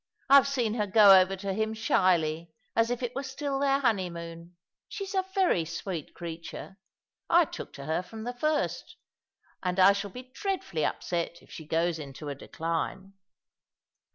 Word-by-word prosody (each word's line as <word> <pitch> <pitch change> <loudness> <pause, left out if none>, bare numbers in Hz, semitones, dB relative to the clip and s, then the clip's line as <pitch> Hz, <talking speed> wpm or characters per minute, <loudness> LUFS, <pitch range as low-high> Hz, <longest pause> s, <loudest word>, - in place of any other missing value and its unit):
I've 280 -1 +8
seen 245 -6 0
her 210 -3 -1
go 200 -1 +8
over 185 +1 +1
to 195 0 -3
him 220 +2 -1
shyly, 170 -6 +1 0.2
as 230 0 +3
if 245 +1 -2
it 245 0 -2
were 275 - -3
still 275 +1 -3
their 275 -1 +3
honeymoon. 170 -6 -2 0.3
She's 395 -1 -5
a 380 -1 0
very 365 - +3
sweet 165 0 -6
creature. 170 +3 -8 0.5
I 345 0 +6
took - - -8
to 140 - -9
her 160 +3 0
from 220 +4 -9
the 245 +2 -4
first; 305 +4 -1 0.7
and 180 0 -1
I 190 +2 +8
shall 200 0 -4
be 250 +7 -9
dreadfully 380 - -2
upset 170 -1 -3
if - - -20
she 160 - -9
goes 165 +1 0
into 145 0 -7
a - - -2
decline." 165 +6 -4
195 Hz, 165 wpm, -28 LUFS, 170-245 Hz, 0.7 s, I've